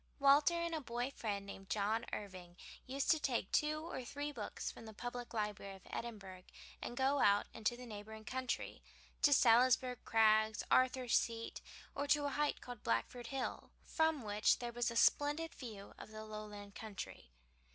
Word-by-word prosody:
Walter 285 +4 +5
and 340 0 -1
a 315 - -1
boy 245 +1 -2
friend 205 -6 -3
named 195 -1 -9
John 215 +3 0
Irving 185 -3 -7 0.3
used 275 +2 +1
to 315 - +4
take 240 -9 -1
two 305 0 +2
or 330 -7 -5
three 285 +4 -4
books - - -4
from 225 - -11
the 220 - -10
public 245 +1 -5
library 210 -3 -3
of 190 - -16
Edinburgh, 195 -6 -6 0.4
and 240 - -5
go 270 +2 +3
out 205 -3 +5
into 225 +2 -1
the 250 - -9
neighboring 220 0 -8
country, 255 0 -3 0.4
to 290 - +6
Salisbury 250 0 +5
Crags, 220 -1 +4
Arthur's 255 -1 +4
Seat, 230 -1 -4 0.3
or 285 0 -2
to 290 0 +3
a - - +1
height 295 +1 0
called 245 -1 -8
Blackford 225 - -1
Hill, 270 0 -3 0.2
from 320 -4 +1
which 210 0 +3
there 240 -1 -5
was 240 0 +1
a 230 - -5
splendid 295 +6 +3
view 215 -6 -9
of - - -9
the 215 0 -8
Lowland 210 -1 -8
country. 205 - -7
235 Hz, 170 wpm, -37 LUFS, 210-270 Hz, 0.4 s, to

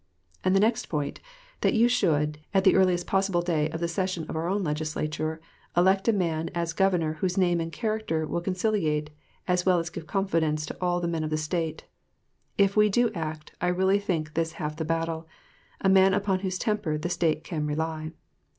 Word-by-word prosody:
And 185 - +3
the - - +5
next 225 +3 +2
point, 145 -3 -3 0.4
that - - +2
you 230 +2 +5
should, 150 -10 +1 0.2
at 190 - +4
the 190 - +6
earliest 180 -2 +3
possible 190 -3 +1
day 160 -3 +1
of 165 - -5
the 170 - 0
session 185 -1 -2
of - - -5
our 160 +2 -1
own 195 +2 0
Legislature, 155 0 -2 0.4
elect 190 +3 +4
a - - +6
man 165 -5 -1
as 170 -1 -1
governor 180 -4 +2
whose 180 -1 0
name 175 -2 +3
and 165 0 -4
character 215 -7 -1
will 170 +2 -2
conciliate 175 -5 0 0.4
as 180 -1 +2
well 185 -1 +4
as 165 -1 -2
give 160 - -8
confidence 160 -4 0
to - - -7
all 175 -1 +1
the 170 - -1
men 165 -2 -1
of 155 - -2
the 155 - 0
State, 160 0 -2 0.7
if 200 -1 +3
we 210 0 +5
do 235 +2 +2
act, 155 -3 -5
I 180 - +1
really 190 +3 +3
think 165 -7 -2
this 165 0 -1
half 150 -1 -4
the 160 0 -3
battle, 165 0 -2 0.5
a - - +2
man 190 0 +6
upon 200 -2 +1
whose 185 -1 -2
temper 205 -8 -1
the 155 - -3
State 165 -3 0
can 155 -3 -3
rely. 155 +1 -2
170 Hz, 200 wpm, -27 LUFS, 155-190 Hz, 0.7 s, the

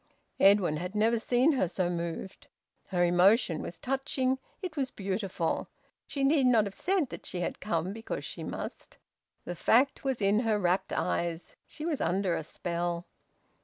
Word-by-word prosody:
Edwin 195 -6 +5
had 180 +5 -5
never 225 +2 +3
seen 250 +6 +3
her 260 - +1
so 180 +1 -1
moved. 170 +2 -4 0.4
Her 175 -2 +2
emotion 175 0 +4
was 170 - -7
touching, 265 0 -1 0.2
it 365 -5 -5
was 270 -3 0
beautiful. 190 -5 -2 0.4
She 275 - -2
need 275 -1 +4
not 235 -4 +5
have 200 - -5
said 360 - 0
that - - -8
she 180 - -3
had - - -3
come 185 -2 -1
because 225 +1 -5
she - - -6
must. - - -7 0.5
The 175 - -3
fact 250 - +3
was 265 -3 -1
in 200 +1 +3
her 225 -3 +2
rapt 180 -1 +1
eyes. 170 -1 -2
She 305 - -7
was 320 -4 -1
under 180 +1 +1
a - - -2
spell. 170 +2 -3
200 Hz, 165 wpm, -30 LUFS, 175-255 Hz, 0.5 s, Edwin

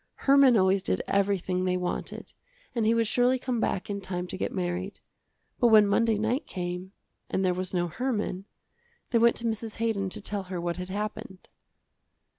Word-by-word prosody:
Herman 275 -3 +5
always 190 0 +3
did 90 - -1
everything 195 -2 0
they 180 0 +1
wanted 180 -1 -4 0.4
and 230 -3 +1
he 230 - +4
would 230 0 +2
surely 245 +4 +3
come 250 -2 -2
back 185 - -1
in 200 -1 -4
time 180 -1 -4
to - - -4
get - - -2
married. 185 +2 -3 0.6
But 240 - +5
when 215 -2 +7
Monday 220 +2 +2
night 225 +6 -1
came, 180 +1 -5 0.4
and 190 - 0
there 180 - +2
was 185 0 -3
no 175 -1 0
Herman, 210 -1 -2 0.7
they 235 - +4
went 235 +1 +5
to 235 - -6
Mrs. 225 -1 -3
Haydon 220 -4 -1
to - - -5
tell 200 -1 -4
her 180 -1 -5
what 170 0 -2
had 180 0 -6
happened. 210 -1 -5
200 Hz, 185 wpm, -27 LUFS, 185-225 Hz, 0.7 s, when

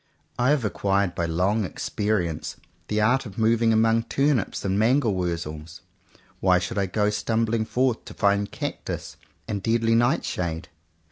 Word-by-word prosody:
I 125 +2 +3
have 145 -6 +2
acquired 100 -2 0
by 85 -1 -2
long 95 +7 +1
experience 90 -2 -2 0.3
the 105 - 0
art 125 +4 +2
of 100 - -12
moving 115 0 +3
among 115 +1 +3
turnips 135 -5 0
and 95 +1 +1
mangel 120 0 +3
wurzels; 85 -2 -4 0.6
why 90 -1 +4
should 95 +4 -2
I 100 - +1
go 105 +2 +1
stumbling 110 +1 0
forth 120 +2 0
to - - -10
find 100 0 +1
cactus - - -5 0.3
and 100 -2 -3
deadly 115 +2 +2
night 120 +3 +2
shade.? 80 -2 -3
105 Hz, 150 wpm, -25 LUFS, 95-115 Hz, 0.6 s, why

